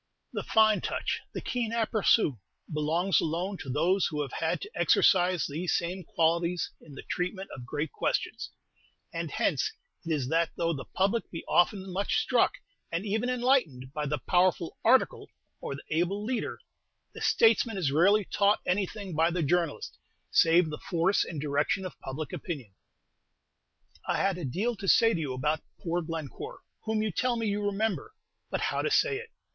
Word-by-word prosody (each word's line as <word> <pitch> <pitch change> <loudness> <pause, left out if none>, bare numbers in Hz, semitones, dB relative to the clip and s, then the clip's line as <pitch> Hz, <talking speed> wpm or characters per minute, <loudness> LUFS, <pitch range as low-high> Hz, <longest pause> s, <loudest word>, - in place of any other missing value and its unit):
The - - -2
fine 220 -1 +4
touch, - - -2
the - - -5
keen 240 -3 -2
aperçu, 220 - +2 0.3
belongs 165 +5 +2
alone 180 +5 -2
to 135 - -7
those 175 +8 +2
who 150 -2 -2
have 135 - -7
had 160 - -1
to 410 - -7
exercise 180 -1 +4
these 165 +5 -1
same 180 +2 -4
qualities 170 +2 0
in 145 -3 -13
the - - -8
treatment 185 +2 -3
of 125 -3 -10
great 150 +5 -3
questions; - - -2 0.6
and - - -3
hence 430 - 0 0.3
it 165 - -4
is 145 -5 0
that 165 +1 +2
though 170 0 +1
the 135 - -6
Public 200 +5 0
be 165 - -7
often 190 +1 +2
much 200 +2 0
struck, 440 - +3 0.4
and 170 +4 -2
even 220 +4 0
enlightened, 240 - +1
by 150 -1 -2
the 150 +1 0
powerful 175 +5 +1
"article" - - +3 0.3
or 140 - -5
the 140 - -10
able 180 +6 0
"leader," 245 0 -2 0.6
the - - -9
Statesman 225 -1 +3
is 160 -8 0
rarely 195 +7 +4
taught 205 +3 +2
anything 195 +1 -2
by 165 +2 +3
the 175 -1 -1
journalist, 170 +1 -1 0.3
save 165 0 +4
the 150 - -5
force 180 +2 +1
and 160 - -6
direction 150 +7 0
of 185 - -8
public 140 +2 -6
opinion. 135 - -6 1.3
I - - +1
had 195 -2 +1
a 170 - -4
deal 205 - -1
to 195 - -6
say 225 +4 +5
to - - -1
you 145 -5 -2
about 150 +4 0 0.2
poor 175 0 -1
Glencore, 165 - -6 0.2
whom 220 -1 0
you 215 - -1
tell 250 +7 0
me 230 -1 -2
you 205 0 -1
remember; 215 - -1 0.3
but, - - -2
how - - 0
to - - 0
say 445 -4 +3
it? 460 +1 -8
180 Hz, 175 wpm, -29 LUFS, 160-210 Hz, 1.3 s, say